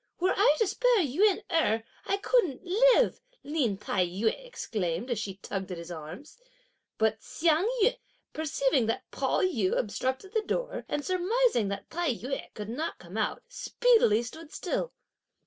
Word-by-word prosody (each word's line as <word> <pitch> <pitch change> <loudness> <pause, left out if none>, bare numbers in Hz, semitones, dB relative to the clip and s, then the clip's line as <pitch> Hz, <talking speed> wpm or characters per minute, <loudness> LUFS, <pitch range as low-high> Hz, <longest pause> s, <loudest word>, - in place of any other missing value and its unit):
"Were 370 +2 +2
I 385 -7 +5
to 445 - +3
spare 465 +1 +3
Yün 370 +9 +2
Erh, 225 -9 +2 0.2
I 395 - +1
couldn't 400 - +1
live!" 480 +7 +4 0.2
Lin 275 -9 0
Tai 195 -2 0
yü 200 +6 0
exclaimed, 225 - -4
as 235 - 0
she 195 -3 -4
tugged 195 -1 -5
at 180 - -4
his 170 +1 -8
arms. 175 - -9 0.6
But 220 0 +2
Hsiang 330 +5 +1
yün, 470 - +3 0.4
perceiving 280 -5 +1
that 225 - -3
Pao - - 0
yü 225 - +1
obstructed 260 - -2
the 440 - +2
door, - - -3
and 295 -1 -2
surmising 370 - +2
that 200 0 -4
Tai 330 -6 0
yü 265 +4 -5
could 210 0 -6
not 300 +8 -3
come - - -12
out, - - -1
speedily 465 - +3
stood 315 +6 -9
still. - - -2
295 Hz, 160 wpm, -29 LUFS, -, 0.6 s, I